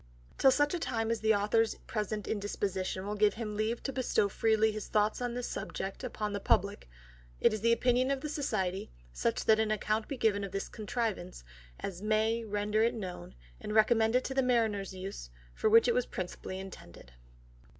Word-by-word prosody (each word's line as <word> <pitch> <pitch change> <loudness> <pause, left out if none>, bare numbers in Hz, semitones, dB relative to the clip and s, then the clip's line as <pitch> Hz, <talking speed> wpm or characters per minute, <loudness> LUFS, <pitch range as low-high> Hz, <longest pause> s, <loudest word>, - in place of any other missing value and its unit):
'Till 270 - +7
such 290 +2 +3
time 230 -6 -1
as 230 - 0
the 220 0 +3
Author's 215 +2 +2
present 210 -1 -3
Indisposition 195 -2 -2
will 205 - -2
give 210 0 +3
him 215 -2 -4
leave 220 +3 -1
to 270 - -3
bestow 250 -5 +1
freely 220 +2 +2
his 215 -1 -6
Thoughts 210 +2 +1
on 245 -1 -2
this 245 -1 -3
Subject 195 +6 -5
upon 215 -4 -3
the 200 - -2
Publick, 200 - +1 0.5
it - - +4
is 215 - -3
the 230 +1 +3
Opinion 250 +2 +3
of 275 -1 0
the 305 - -3
Society, 215 -11 -2 0.3
that - - +1
such 220 0 +3
an 220 -1 +1
Account 215 +1 0
be 275 - -4
given 205 -4 +2
of 195 -1 -6
this 195 - -3
Contrivance, 215 - -3 0.4
as 185 -2 -5
may 220 +2 +1
render 210 0 0
it 235 +2 +2
known, 180 - -7 0.2
and 210 - -5
recommend 220 +1 +4
it 255 - +3
to 265 - -3
the 265 - +3
Mariners 225 -6 +1
use, 185 - -7 0.2
for 215 - +1
which 230 +2 +6
it 240 - +4
was 250 - +1
principally 185 +1 -5
intended. 85 - -11
215 Hz, 190 wpm, -31 LUFS, 200-235 Hz, 0.5 s, Till